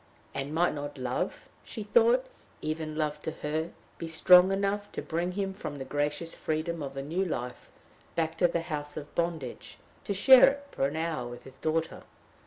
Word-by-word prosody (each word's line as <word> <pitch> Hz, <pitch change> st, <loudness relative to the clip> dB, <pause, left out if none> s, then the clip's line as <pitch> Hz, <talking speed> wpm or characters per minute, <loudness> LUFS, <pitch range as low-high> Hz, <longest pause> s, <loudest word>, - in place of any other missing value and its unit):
And 135 Hz, +1 st, -3 dB
might 170 Hz, +3 st, +2 dB
not 145 Hz, 0 st, -6 dB
love, 125 Hz, -1 st, -3 dB, 0.2 s
she -, -, -6 dB
thought, 480 Hz, +1 st, +4 dB, 0.3 s
even 155 Hz, 0 st, -3 dB
love 150 Hz, -1 st, -1 dB
to -, -, -3 dB
her, 155 Hz, +2 st, -1 dB, 0.3 s
be 165 Hz, -, -4 dB
strong 180 Hz, +3 st, +7 dB
enough 200 Hz, +1 st, -1 dB
to -, -, -3 dB
bring 175 Hz, +2 st, -2 dB
him 195 Hz, 0 st, -2 dB
from 170 Hz, -6 st, -6 dB
the 135 Hz, -2 st, -6 dB
gracious 145 Hz, +4 st, -1 dB
freedom 160 Hz, +1 st, -2 dB
of 135 Hz, -1 st, -5 dB
the 135 Hz, -, -3 dB
new 170 Hz, +7 st, -1 dB
life, 125 Hz, -8 st, -4 dB, 0.5 s
back 165 Hz, -1 st, 0 dB
to 175 Hz, -, +6 dB
the 170 Hz, -1 st, -1 dB
house 150 Hz, -3 st, -5 dB
of 150 Hz, -1 st, -7 dB
bondage, 165 Hz, -7 st, -3 dB, 0.3 s
to 200 Hz, -, -1 dB
share 260 Hz, +6 st, +9 dB
it 285 Hz, +1 st, -6 dB
for 135 Hz, -, +1 dB
an 145 Hz, -, -5 dB
hour 160 Hz, -6 st, -2 dB
with 120 Hz, 0 st, -9 dB
his 135 Hz, 0 st, -13 dB
daughter? 160 Hz, +3 st, -1 dB
160 Hz, 190 wpm, -29 LUFS, 145-180 Hz, 0.5 s, share